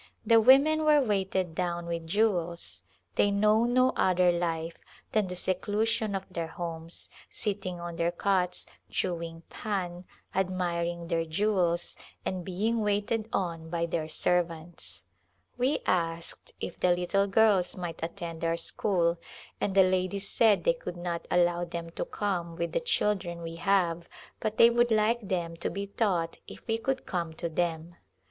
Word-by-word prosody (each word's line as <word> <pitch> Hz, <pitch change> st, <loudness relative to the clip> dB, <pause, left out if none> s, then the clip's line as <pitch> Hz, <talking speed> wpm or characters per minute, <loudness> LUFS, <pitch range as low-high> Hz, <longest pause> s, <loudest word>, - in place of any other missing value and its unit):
The 230 Hz, -1 st, +6 dB
women 280 Hz, +6 st, +6 dB
were 305 Hz, -1 st, +6 dB
weighted 190 Hz, -, 0 dB
down 175 Hz, 0 st, -2 dB
with 170 Hz, -1 st, -4 dB
jewels; 175 Hz, -3 st, 0 dB, 0.4 s
they 205 Hz, -, +4 dB
know 210 Hz, +3 st, +3 dB
no 255 Hz, +1 st, +3 dB
other 180 Hz, -1 st, +4 dB
life 165 Hz, -1 st, -2 dB, 0.3 s
than 215 Hz, -3 st, +2 dB
the 180 Hz, -, -5 dB
seclusion 205 Hz, +3 st, 0 dB
of 190 Hz, 0 st, -3 dB
their 170 Hz, -2 st, -3 dB
homes, 165 Hz, 0 st, -6 dB, 0.2 s
sitting 195 Hz, -4 st, -3 dB
on 170 Hz, -1 st, -6 dB
their 170 Hz, 0 st, +2 dB
cots, 180 Hz, 0 st, 0 dB, 0.2 s
chewing 170 Hz, -2 st, -3 dB
pan^ 180 Hz, -4 st, -3 dB, 0.3 s
admiring 175 Hz, -2 st, -1 dB
their 165 Hz, -1 st, +1 dB
jewels, 175 Hz, 0 st, 0 dB, 0.3 s
and 185 Hz, -1 st, -2 dB
being 215 Hz, +6 st, 0 dB
waited 210 Hz, +2 st, 0 dB
on 165 Hz, -4 st, -2 dB
by 170 Hz, 0 st, 0 dB
their 165 Hz, -2 st, -2 dB
servants. 170 Hz, 0 st, -1 dB, 0.5 s
We 255 Hz, +4 st, +1 dB
asked 170 Hz, -2 st, -1 dB
if 175 Hz, -, -6 dB
the 180 Hz, -1 st, +4 dB
little 195 Hz, +3 st, +1 dB
girls 200 Hz, -3 st, +3 dB
might 175 Hz, -2 st, -5 dB
attend 165 Hz, 0 st, -5 dB
our 165 Hz, 0 st, +1 dB
school 170 Hz, -1 st, 0 dB, 0.4 s
and 195 Hz, -, 0 dB
the 195 Hz, -, +8 dB
ladies 185 Hz, +1 st, 0 dB
said 220 Hz, -3 st, +4 dB
they -, -, +4 dB
could -, -, -7 dB
not 175 Hz, -1 st, -4 dB
allow 175 Hz, 0 st, +3 dB
them 170 Hz, -1 st, -5 dB
to -, -, -3 dB
come 175 Hz, -5 st, -2 dB
with 170 Hz, 0 st, -2 dB
the -, -, +1 dB
children 195 Hz, -, 0 dB
we 165 Hz, 0 st, -6 dB
have 175 Hz, -3 st, +1 dB, 0.3 s
but 215 Hz, 0 st, -2 dB
they 230 Hz, 0 st, +8 dB
would 240 Hz, 0 st, +3 dB
like 220 Hz, 0 st, +2 dB
them 170 Hz, -3 st, -1 dB
to 170 Hz, -, -2 dB
be 200 Hz, +3 st, -4 dB
taught 190 Hz, -5 st, -1 dB
if -, -, -11 dB
we 225 Hz, 0 st, 0 dB
could 265 Hz, +2 st, -2 dB
come 170 Hz, -3 st, -2 dB
to 170 Hz, -, -3 dB
them. 165 Hz, 0 st, -2 dB
180 Hz, 155 wpm, -29 LUFS, 170-205 Hz, 0.5 s, the